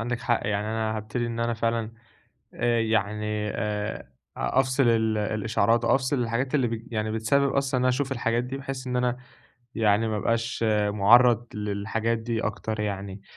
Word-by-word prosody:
عندك 120 Hz, +1 st, -2 dB
حق، 120 Hz, -2 st, +1 dB
يعني 105 Hz, 0 st, -1 dB
أنا 110 Hz, 0 st, -1 dB
هابتدي 110 Hz, +3 st, -3 dB
إن 115 Hz, 0 st, -4 dB
أنا 115 Hz, 0 st, 0 dB
فعلًا 115 Hz, 0 st, -1 dB, 0.6 s
آآ 120 Hz, -1 st, +1 dB
يعني 105 Hz, -1 st, -1 dB
آآ 105 Hz, -1 st, -2 dB, 0.4 s
أ 135 Hz, -, +1 dB
أفصل 130 Hz, +1 st, +1 dB
ال 110 Hz, -1 st, +2 dB
الإشعارات 110 Hz, +2 st, +1 dB
أو 120 Hz, -, +4 dB
أفصل 135 Hz, +1 st, 0 dB
الحاجات 120 Hz, +4 st, -2 dB
اللي 135 Hz, -4 st, +3 dB
بت 115 Hz, +1 st, -6 dB
يعني 110 Hz, -1 st, -1 dB
بتسبب 135 Hz, +5 st, +2 dB
أصلًا 135 Hz, -2 st, 0 dB
إن -, -, +1 dB
أشوف 135 Hz, +2 st, 0 dB
الحاجات 120 Hz, -1 st, 0 dB
دي، 130 Hz, +2 st, -5 dB
بحيث 135 Hz, -1 st, -6 dB
إن 125 Hz, -, -2 dB
أنا 125 Hz, 0 st, +1 dB, 0.6 s
يعني 110 Hz, 0 st, +2 dB
ما 110 Hz, -, -1 dB
أبقاش 115 Hz, +2 st, -1 dB, 0.2 s
مُعرّض 115 Hz, +3 st, +5 dB
للحاجات 105 Hz, +2 st, -1 dB
دي 115 Hz, 0 st, -2 dB
أكتر 110 Hz, -1 st, -3 dB
يعني. 100 Hz, -1 st, -4 dB
115 Hz, 170 wpm, -26 LUFS, 110-125 Hz, 0.6 s, مُعرّض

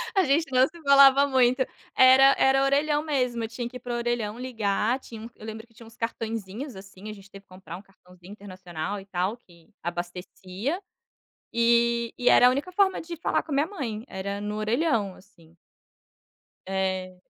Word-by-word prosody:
A 385 Hz, -, +4 dB
gente 285 Hz, +1 st, +1 dB
não 255 Hz, +1 st, +4 dB
se 340 Hz, +1 st, -15 dB
falava 280 Hz, 0 st, +6 dB
muito, 255 Hz, -1 st, +3 dB, 0.3 s
era 265 Hz, +1 st, +7 dB
era 270 Hz, 0 st, +3 dB
orelhão 295 Hz, +2 st, +1 dB
mesmo, 250 Hz, -6 st, -1 dB
eu -, -, -2 dB
tinha 235 Hz, +1 st, -5 dB
que 250 Hz, -, -9 dB
ir -, -, -15 dB
para 245 Hz, 0 st, -6 dB
o -, -, -1 dB
orelhão 235 Hz, -2 st, -2 dB
ligar, 230 Hz, 0 st, -1 dB
tinha 225 Hz, -4 st, -11 dB
um 230 Hz, -, -8 dB
eu 215 Hz, -, -12 dB
lembro 220 Hz, +1 st, -8 dB
que 230 Hz, -, -28 dB
tinha 230 Hz, +1 st, -15 dB
uns 225 Hz, -, -17 dB
cartaõezinhos, 225 Hz, +2 st, -5 dB
assim, 190 Hz, +2 st, -11 dB
a -, -, -6 dB
gente 195 Hz, -1 st, -15 dB
teve 195 Hz, 0 st, -13 dB
que -, -, -50 dB
comprar 185 Hz, -2 st, -10 dB
um 190 Hz, -, -12 dB
cartãozinho 180 Hz, -1 st, -18 dB
internacional, 185 Hz, -2 st, -6 dB
e 195 Hz, -, -13 dB
tal, 195 Hz, +4 st, -2 dB
que 170 Hz, -7 st, -23 dB
abastecia, 180 Hz, -, -5 dB, 0.7 s
e 235 Hz, 0 st, +2 dB
e 245 Hz, -, +2 dB
era 245 Hz, -, +7 dB
a -, -, +7 dB
única 285 Hz, +8 st, -3 dB
forma 385 Hz, +1 st, +2 dB
de 340 Hz, +1 st, -7 dB
falar 335 Hz, -, -1 dB
com 310 Hz, -, -11 dB
a -, -, 0 dB
minha 290 Hz, +3 st, +2 dB
mãe, 235 Hz, -, -5 dB
era 200 Hz, +1 st, -5 dB
no 210 Hz, 0 st, -4 dB
orelhão, 220 Hz, -, 0 dB
assim. 170 Hz, -4 st, -21 dB, 1.1 s
É. 190 Hz, -1 st, -2 dB
230 Hz, 195 wpm, -26 LUFS, 195-265 Hz, 1.1 s, era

